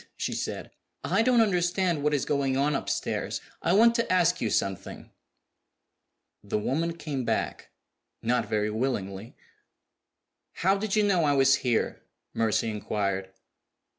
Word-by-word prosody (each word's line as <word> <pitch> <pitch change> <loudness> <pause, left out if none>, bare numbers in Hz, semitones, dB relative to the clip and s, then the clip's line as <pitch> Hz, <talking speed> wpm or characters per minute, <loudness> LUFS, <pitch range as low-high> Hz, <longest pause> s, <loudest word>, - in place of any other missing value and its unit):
she - - -2
said. - - -4 0.3
"I - - +2
don't 240 0 +4
understand 180 -4 +1
what 150 +1 +1
is 140 - -1
going 140 -2 0
on 145 +2 +2
upstairs; - - -2 0.2
I 170 - +1
want 230 +4 +6
to 235 -4 -1
ask 180 -1 +3
you 115 - 0
something." 95 -1 -3 1.3
The 100 +1 -2
woman 165 +10 -1
came 145 -5 -4
back - - -2 0.5
not 115 -2 0
very 105 0 0
willingly. 110 -3 -3 1.2
"How 190 +3 +2
did 200 +1 -2
you 215 - +3
know 190 -5 +2
I 145 - +3
was 135 0 +5
here?" 125 -4 -1 0.3
Mercy 115 0 +1
inquired. 100 -2 -2
140 Hz, 135 wpm, -27 LUFS, 110-180 Hz, 1.3 s, want